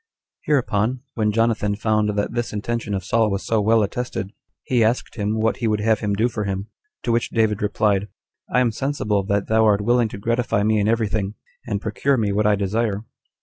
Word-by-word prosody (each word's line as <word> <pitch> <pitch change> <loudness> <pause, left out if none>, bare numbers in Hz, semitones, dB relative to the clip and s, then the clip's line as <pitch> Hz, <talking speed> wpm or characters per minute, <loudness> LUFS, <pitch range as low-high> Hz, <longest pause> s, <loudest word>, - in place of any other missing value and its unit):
7. 150 - +1
Hereupon, 120 -2 +1
when 105 -2 +1
Jonathan 110 -2 +1
found 110 0 +1
that 100 - -1
this 120 -1 -2
intention 105 0 -2
of 95 - -3
Saul 110 +3 +2
was 100 0 -3
so 110 -2 +1
well 110 +1 +4
attested, 105 -2 -4 0.3
he 120 -3 +2
asked 115 +3 0
him 105 0 -1
what 110 +1 +1
he 120 - -1
would 105 -1 +1
have 110 0 +2
him 105 -2 -1
do 110 +4 +2
for 110 -3 -3
him. 100 +1 -3 0.3
To 120 - 0
which 115 0 +1
David 110 -3 +1
replied, 105 -1 +1 0.4
"I 125 - +3
am 120 -2 +2
sensible 110 -5 -1
that 100 0 0
thou 110 0 +3
art 105 -1 +3
willing 120 +2 +3
to - - -7
gratify 115 0 0
me 110 0 +2
in 100 - +1
every 115 -1 +2
thing, 100 0 -2 0.3
and 105 -3 -1
procure 125 +6 0
me 105 -3 +1
what 105 +1 +2
I 105 - +4
desire. 105 +1 -1
110 Hz, 215 wpm, -22 LUFS, 105-115 Hz, 0.4 s, well